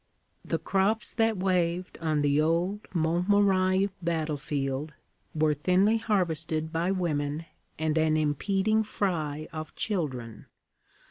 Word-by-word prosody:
The - - -1
crops 200 +3 0
that 225 -2 +2
waved 180 -1 0
on 155 -2 0
the 145 +1 +3
old 175 +6 0
Montmirail 185 +3 +2
battlefield 150 -3 -2 0.4
were 155 0 +3
thinly 185 +9 +3
harvested 160 -6 -1
by 170 +2 0
women 155 -4 -1 0.3
and 155 0 0
an 155 0 +3
impeding 195 +8 +1
fry 155 -8 -2
of 155 -1 -6
children. 130 - -3
165 Hz, 110 wpm, -28 LUFS, 155-190 Hz, 0.4 s, the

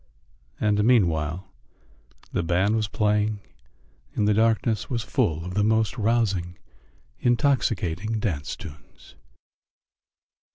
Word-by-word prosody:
And 105 -1 +2
meanwhile 90 -5 +1 0.8
the - - 0
band 90 +6 +1
was 110 -2 0
playing 105 0 0 0.8
and 105 - +1
the 105 - +4
darkness 110 -1 +1
was 115 -3 -2
full 80 +1 0
of 90 - -5
the 105 +2 +1
most 110 +1 +2
rousing, 105 -7 0 0.6
intoxicating 115 - +1
dance 80 -9 -3
tunes. 80 -4 -13
105 Hz, 100 wpm, -25 LUFS, 90-110 Hz, 0.8 s, the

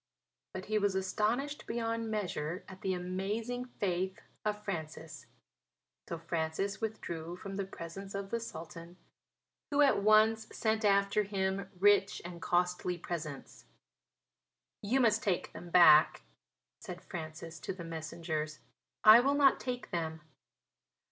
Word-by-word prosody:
But 185 - -5
he 215 0 +1
was 200 -2 +1
astonished 220 +9 -1
beyond 230 -1 -2
measure 180 -5 -3
at 190 0 -11
the 190 -3 0
amazing 205 +7 -3
faith 190 -5 -2 0.2
of 210 0 -2
Francis. 160 -4 -6 0.8
So 170 - -3
Francis 165 +5 -2
withdrew 175 -6 -4
from 195 +1 -7
the 200 0 -2
presence 195 +2 -8
of 195 0 -5
the 235 - 0
Sultan, 170 -4 -9 0.7
who 290 0 +2
at 275 -7 +4
once 215 +1 +4
sent 220 0 0
after 200 0 +3
him 195 -1 -2
rich 200 0 +4
and 175 -1 -8
costly 180 0 0
presents. 160 -5 -6 1.2
"You 230 +6 +1
must 225 -2 +3
take 190 -4 -1
them 175 - -9
back," 155 -3 +7 0.6
said 180 0 -8
Francis 165 -1 -7
to - - -4
the 180 -2 -7
messengers; 160 -1 -4 0.5
"I 215 +2 +10
will 275 +3 +2
not 280 -2 +5
take 250 -1 -5
them." 160 -2 -3
190 Hz, 130 wpm, -32 LUFS, 170-215 Hz, 1.2 s, I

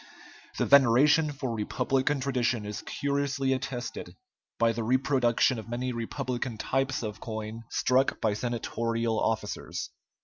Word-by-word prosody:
The - - +1
veneration 140 +4 +5
for 135 -4 -4
republican 130 +5 0
tradition 125 -4 0
is 105 0 -5
curiously 140 -1 -1
attested 130 -1 -5 0.4
by 115 0 +3
the 115 +1 -3
reproduction 130 0 +2
of 110 - -9
many 125 +1 -2
republican 120 0 -3
types 135 +2 -1
of 105 -2 -5
coin 110 0 -6
struck 130 +2 +2
by 110 -2 +1
senatorial 115 0 -1
officers. 110 -2 -2
120 Hz, 125 wpm, -28 LUFS, 115-135 Hz, 0.4 s, veneration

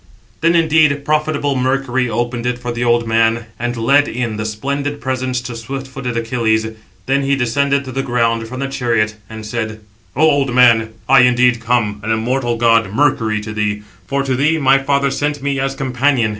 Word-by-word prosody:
Then, 165 +1 +2
indeed, 155 -3 +3
profitable 150 -2 0
Mercury 130 -1 0
opened 120 +1 -2
it 125 0 -1
for 120 0 -5
the 120 0 -3
old 120 -1 +2
man, 115 0 +2
and 120 +1 -3
led 140 +6 +3
in 120 -2 -3
the 110 0 -3
splendid 140 +6 -3
presents 130 -1 -2
to 125 -1 -7
swift 135 +4 -6
footed 130 -2 -5
Achilles; 115 -1 0 0.4
then 135 +1 +1
he 140 0 +1
descended 140 +3 0
to 130 - -7
the 135 +2 -2
ground, 115 -3 0
from 130 +3 -7
the 135 - -1
chariot, 115 -5 -1
and 110 -1 -8
said: 110 -1 -4 0.4
"O 150 - +1
old 140 -4 +1
man, 115 -3 +4
I 135 0 +6
indeed 125 -1 +3
come, 115 -3 0
an 110 - -4
immortal 120 +2 0
god, 115 -3 +3
Mercury, 115 -4 +1
to 105 0 -7
thee; 105 0 -2 0.2
for 140 0 -1
to 135 -1 -1
thee 150 +5 +2
my 135 -2 +4
father 140 0 0
sent 145 0 -2
me 140 -1 -1
as 135 0 -2
companion. 130 -2 +1
125 Hz, 190 wpm, -17 LUFS, 115-140 Hz, 0.4 s, I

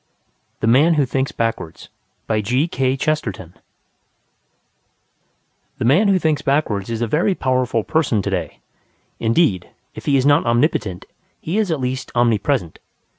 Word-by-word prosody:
THE - - 0
MAN 140 +9 +4
WHO 145 -2 +2
THINKS 130 +2 -2
BACKWARDS 115 -8 -4 0.4
The 130 - -1 2.2
man 150 - +3
who 195 -1 +4
thinks 155 -3 0
backwards 120 -8 0
is 115 0 -2
a - - 0
very 175 - +1
powerful 130 -5 0
person 145 -10 0
to - - -2
day: - - -4 0.6
indeed, 115 - +1 0.2
if - - -11
he 140 -1 +4
is 130 - +1
not 145 0 +4
omnipotent, 115 - 0 0.3
he 180 +7 -2
is 210 -4 0
at 160 -3 -1
least 130 +1 -3
omnipresent. 120 - 0
130 Hz, 125 wpm, -20 LUFS, 115-155 Hz, 2.2 s, MAN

